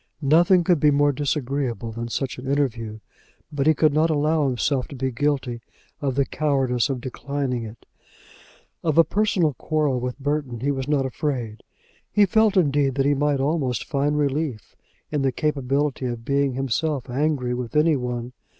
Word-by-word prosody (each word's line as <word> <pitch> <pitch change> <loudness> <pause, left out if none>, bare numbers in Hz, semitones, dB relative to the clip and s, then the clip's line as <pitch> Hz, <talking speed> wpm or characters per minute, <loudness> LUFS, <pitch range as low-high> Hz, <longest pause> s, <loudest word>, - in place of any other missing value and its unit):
Nothing 175 +5 +5
could 170 -2 +3
be 150 - +5
more 145 0 +3
disagreeable 135 -5 -2
than 115 +1 -5
such 130 +2 -3
an 130 - -8
interview, 115 -6 -1 0.5
but 145 -1 -1
he 155 - +5
could 155 0 +3
not 155 +2 +3
allow 155 0 +2
himself 130 +1 0
to 140 - -9
be 130 0 -2
guilty 130 -2 -1 0.4
of 135 -3 -1
the 140 0 +2
cowardice 135 -5 0
of 130 -3 -3
declining 130 -1 -3
it. 110 +2 -11 1.0
Of 160 -2 0
a 165 - +8
personal 190 -6 +1
quarrel 145 0 0
with 125 0 -4
Burton 140 -4 -2
he 140 +2 +1
was 135 -1 -3
not 145 -2 +1
afraid. 125 -5 -3 0.5
He 210 - +5
felt, 215 +1 +3
indeed, 145 -5 +2
that 135 -1 +1
he 145 - +4
might 145 0 +1
almost 135 -4 0
find 145 +1 0
relief 140 -6 -2 0.4
in 150 -2 0
the 135 -1 +2
capability 140 -1 -1
of 120 -1 -5
being 140 -1 +1
himself 135 +2 -1
angry 135 -1 0
with 125 +2 -5
any 155 +1 +4
one. 125 -1 -4
140 Hz, 170 wpm, -23 LUFS, 125-150 Hz, 1.0 s, a